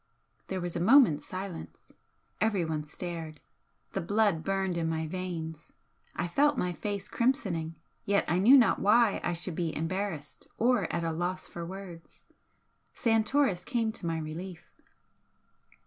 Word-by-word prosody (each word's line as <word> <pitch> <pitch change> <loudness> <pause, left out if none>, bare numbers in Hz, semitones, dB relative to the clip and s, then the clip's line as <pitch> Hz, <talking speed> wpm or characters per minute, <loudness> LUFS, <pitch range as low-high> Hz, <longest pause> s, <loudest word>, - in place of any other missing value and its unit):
There 190 - -3
was 175 -1 -4
a - - -1
moment's 220 - +5
silence. 185 -2 -7 0.5
Everyone 170 -8 0
stared. 160 -1 -6 0.5
The - - -2
blood 200 -3 +2
burned 195 -2 0
in 165 -1 0
my 160 0 -1
veins, 165 -2 -5 0.4
I - - -1
felt 290 +9 +3
my 180 -4 0
face 200 +2 -4
crimsoning, 195 - 0 0.3
yet 200 0 +2
I 175 - +2
knew 245 +9 +8
not 245 - +4
why 215 +1 +4
I 175 - 0
should 175 +1 -2
be 165 -1 -2
embarrassed 165 -2 -4
or 240 -2 +2
at 170 - -1
a 165 - 0
loss 175 +3 -3
for 170 -1 -7
words. 185 -3 -10 0.7
Santoris 225 -3 +2
came 225 +2 0
to 215 -6 -6
my 165 -1 -1
relief. 160 +3 -7
180 Hz, 145 wpm, -30 LUFS, 165-210 Hz, 0.7 s, knew